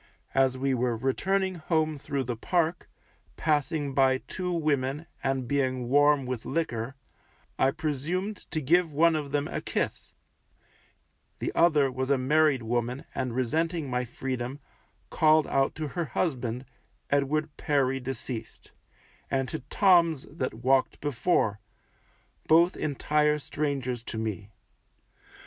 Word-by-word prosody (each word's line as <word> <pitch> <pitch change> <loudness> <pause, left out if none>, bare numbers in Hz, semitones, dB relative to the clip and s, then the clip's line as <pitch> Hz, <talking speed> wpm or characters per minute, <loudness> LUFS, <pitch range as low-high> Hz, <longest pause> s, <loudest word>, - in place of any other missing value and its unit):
As 135 -1 +3
we 135 +1 0
were 120 -2 0
returning 190 - 0
home 155 -2 0
through 140 -1 -3
the 120 -1 -3
Park, 170 +7 -1 0.5
passing 150 -2 0
by 130 -1 +4
two 180 +6 -5
women, 150 -3 0 0.2
and 135 -2 -1
being 130 -2 0
warm 145 0 +4
with 125 -3 -4
liquor, 135 -6 -2 0.6
I 130 - +5
presumed 160 +8 -3
to 155 - -2
give 165 +4 +3
one 165 +3 +4
of 145 -3 -3
them 145 0 0
a - - -4
kiss; - - -3 1.2
the - - -2
other 150 -5 +4
was 130 +1 -3
a 140 - +4
married 140 0 +3
woman, 120 +3 -2
and 130 -3 -2
resenting 155 +3 -1
my 125 0 0
freedom, 125 +2 -4 0.5
called 155 -1 +4
out 135 0 +1
to 155 -2 -4
her 170 +3 -2
husband, 125 -6 -2 0.5
Edward 145 +2 +1
Perry 135 -3 +1
deceased, 125 -2 -6 0.6
and 135 -1 0
to 160 - -4
Toms 170 -7 +4
that 135 -6 -3
walked 135 0 +3
before, 125 - +1 0.9
both 170 +3 +5
entire 150 +1 +1
strangers 140 -5 -2
to 115 - -6
me. 105 -3 -4
140 Hz, 130 wpm, -28 LUFS, 130-155 Hz, 1.2 s, I